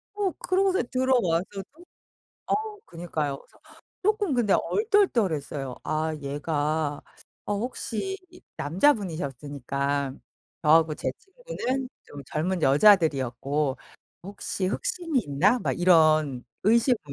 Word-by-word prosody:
어. 400 -3 0 0.2
그러고서 380 -2 +2
들어와서도 220 -8 0 0.8
어 - - +1 0.3
그니까요. 155 -5 -3
그래서 - - -23 0.4
쪼끔 415 -5 +1
근데 235 -6 +2
얼떨떨했어요. 190 - +1
아 155 0 -1
얘가 145 +1 -2 0.4
어 205 - -1
혹시 250 - -3 0.4
남자분이셨으니까, 145 - -1 0.5
저하고 160 0 +4
제 - - -2
친구는 370 - -4
좀 145 - -10
젊은 170 +6 -2
여자들이었고. 140 - +3 0.5
'혹시 195 -1 -3
흑심이 330 - -1
있나.' 190 - +2
막 - - -1
이런 155 -7 +4 0.2
의심을 235 +4 +4
170 Hz, 250 characters per minute, -26 LUFS, -, 0.8 s, 저하고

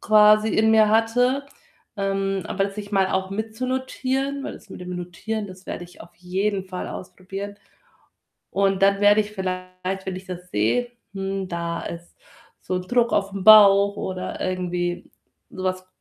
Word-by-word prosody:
quasi 215 0 +6
in 220 0 +4
mir 220 -1 +6
hatte. 245 +5 +2 0.5
Ähm, 195 -2 -1
aber 195 0 0
das 195 - -5
sich 205 0 -8
mal 195 -1 +3
auch 190 0 -1
mitzunotieren, 260 +5 -2
weil - - -4
das 220 - -14
mit - - -9
dem 180 0 -6
Notieren, 205 +5 -4
das 185 0 -13
werde 175 - -5
ich 175 - -17
auf - - -13
jeden 190 +2 -2
Fall 185 -1 -5
ausprobieren. 195 +2 -7 0.9
Und 195 -1 +1
dann 200 0 +4
werde 205 +1 +6
ich 210 0 -4
vielleicht, 185 0 -4
wenn 190 -1 -3
ich 185 - -8
das 180 0 -8
sehe: 115 - +1 0.2
„Hm, 195 -1 -3
da 170 -1 -3
ist 170 0 -8 0.5
so 185 - -3
'n 180 - -2
Druck 240 +5 +1
aufm 195 -1 -1
Bauch,“ 200 -2 +8
oder 185 -1 -4
irgendwie 180 -1 -2 0.4
so 185 - -7
was, 185 0 -2
195 Hz, 165 wpm, -23 LUFS, 185-215 Hz, 0.9 s, Bauch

